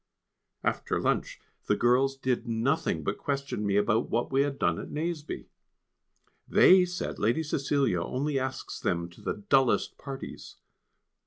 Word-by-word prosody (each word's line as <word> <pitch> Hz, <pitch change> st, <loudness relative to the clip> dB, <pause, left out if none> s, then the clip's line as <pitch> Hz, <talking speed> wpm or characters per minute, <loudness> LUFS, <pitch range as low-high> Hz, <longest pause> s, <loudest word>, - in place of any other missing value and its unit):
After -, -, 0 dB
lunch -, -, -1 dB, 0.3 s
the -, -, +3 dB
girls 130 Hz, +3 st, +2 dB
did 130 Hz, -3 st, -1 dB
nothing 115 Hz, -, 0 dB
but 100 Hz, -, -2 dB
question 140 Hz, -6 st, -2 dB
me 100 Hz, -1 st, +1 dB
about 105 Hz, +2 st, +2 dB
what 120 Hz, -, -1 dB
we 135 Hz, +1 st, +3 dB
had 140 Hz, -1 st, -1 dB
done -, -, +1 dB
at -, -, -7 dB
Nazeby. 155 Hz, 0 st, -4 dB, 1.0 s
They 185 Hz, 0 st, +7 dB
said 180 Hz, 0 st, -4 dB
Lady 120 Hz, +10 st, +1 dB
Cecilia 140 Hz, -, 0 dB
only 135 Hz, +8 st, -1 dB
asks 130 Hz, 0 st, -4 dB
them 85 Hz, 0 st, -1 dB
to -, -, -16 dB
the 105 Hz, -, -4 dB
dullest 135 Hz, -2 st, +2 dB
parties. 135 Hz, -1 st, -8 dB
135 Hz, 145 wpm, -28 LUFS, 115-145 Hz, 1.0 s, They